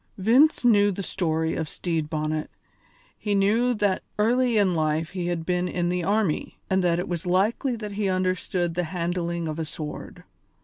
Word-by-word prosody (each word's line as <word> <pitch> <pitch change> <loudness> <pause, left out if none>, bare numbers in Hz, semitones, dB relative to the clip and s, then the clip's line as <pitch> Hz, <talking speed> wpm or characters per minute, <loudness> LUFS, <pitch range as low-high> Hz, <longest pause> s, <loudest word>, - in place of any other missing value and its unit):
Vince 245 +9 +4
knew 205 -3 +5
the 195 +1 -4
story 160 -4 -1
of 160 -2 -3
Stede 165 -4 -2
Bonnet; 155 0 -2 0.7
he 205 -1 -2
knew 225 +5 +2
that 205 -3 +1 0.2
early 240 +2 +2
in 195 -3 +3
life 155 0 0
he 180 -2 -3
had 170 -2 -2
been 180 0 0
in 175 -1 -1
the 180 0 -1
army, 200 -4 0
and 190 0 +2
that 170 -1 +2
it 175 - -2
was 175 0 -4
likely 215 +8 +1
that 210 -2 -6
he 200 -1 -1
understood 185 -1 -1
the 180 +1 -1
handling 170 0 -2
of 155 +1 -4
a - - 0
sword. 150 -1 -7
180 Hz, 180 wpm, -25 LUFS, 165-205 Hz, 0.7 s, knew